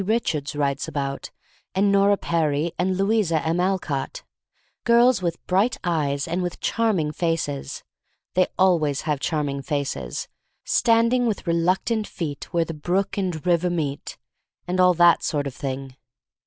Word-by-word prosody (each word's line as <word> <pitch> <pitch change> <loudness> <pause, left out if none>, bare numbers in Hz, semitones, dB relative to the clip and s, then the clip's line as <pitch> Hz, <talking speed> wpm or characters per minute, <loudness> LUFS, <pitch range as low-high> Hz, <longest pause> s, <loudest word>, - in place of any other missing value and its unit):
Richards 165 -10 -1
writes 140 -1 -1
about, 140 -1 -4 0.5
and 200 +1 +3
Nora 200 0 +4
Perry, 160 -2 0
and 185 +1 +1
Louisa 195 -5 +2
M. 165 +2 0
Alcott, 180 -7 -2 0.3
— - - -43
girls 235 0 +4
with 170 -2 -3
bright 195 +6 +2
eyes, 145 -5 0
and 170 +3 -1
with 175 -1 -4
charm 225 -3 +1
ing 150 -1 -1
faces 160 -4 -2 0.5
(they 185 0 +3
always 160 -7 +2
have 150 -3 -1
charming 145 -2 -1
faces), 135 - -3 0.4
standing 230 +2 +3
with 215 - -2
reluctant 185 +6 +1
feet 155 -6 -6
where 170 -1 +1
the 165 - -6
brook 180 +6 -1
and 180 -6 -3
river 180 0 +2
meet, 150 -5 -3 0.3
— - - -52
and 180 +1 -1
all 180 -1 +5
that 175 0 +5
sort 145 -3 -1
of 140 - -4
thing. 135 -1 -5
170 Hz, 155 wpm, -23 LUFS, 145-190 Hz, 0.5 s, all